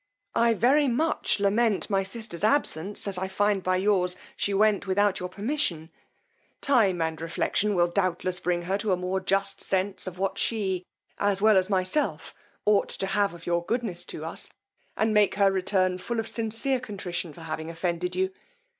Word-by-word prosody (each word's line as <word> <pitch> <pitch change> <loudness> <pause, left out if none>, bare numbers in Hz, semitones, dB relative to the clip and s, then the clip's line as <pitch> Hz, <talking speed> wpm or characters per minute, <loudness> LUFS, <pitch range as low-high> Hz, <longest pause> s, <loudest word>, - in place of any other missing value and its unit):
I 230 0 +3
very 275 +7 +4
much 260 -2 +1
lament 205 +1 +2
my 195 -2 +1
sister's 195 -2 -5
absence, 210 - +1
as 190 -2 -2
I 190 - -2
find 205 +1 +1
by 185 0 +1
yours 185 -2 +1 0.2
she 200 - -1
went 200 0 +2
without 200 +1 +2
your 180 - -4
permission: 195 - -1 0.7
time 200 -11 +3
and 160 0 -3
reflection 200 +5 0
will 175 -1 +4
doubtless 185 0 0
bring 175 -1 -1
her 190 +3 -1
to 205 -2 +1
a - - +1
more 180 +1 -1
just 195 +1 0
sense 190 0 -1
of 180 -1 -6
what 195 +1 -2
she, 190 -5 -1 0.3
as 200 -1 +1
well 215 +1 +5
as 190 +1 +3
myself, 190 +9 0 0.3
ought 210 -1 +3
to - - -1
have 195 -1 0
of 165 - -13
your 170 0 0
goodness 220 -4 -2
to - - -7
us, - - -2 0.5
and 220 0 +2
make 210 -2 +4
her 200 -1 +4
return 185 -1 +1
full 235 +5 -3
of 225 - -2
sincere 230 +4 -1
contrition 190 -7 -5
for 165 - -13
having 160 0 -5
offended 175 +1 -2
you. 190 +1 0
195 Hz, 180 wpm, -27 LUFS, 180-210 Hz, 0.7 s, well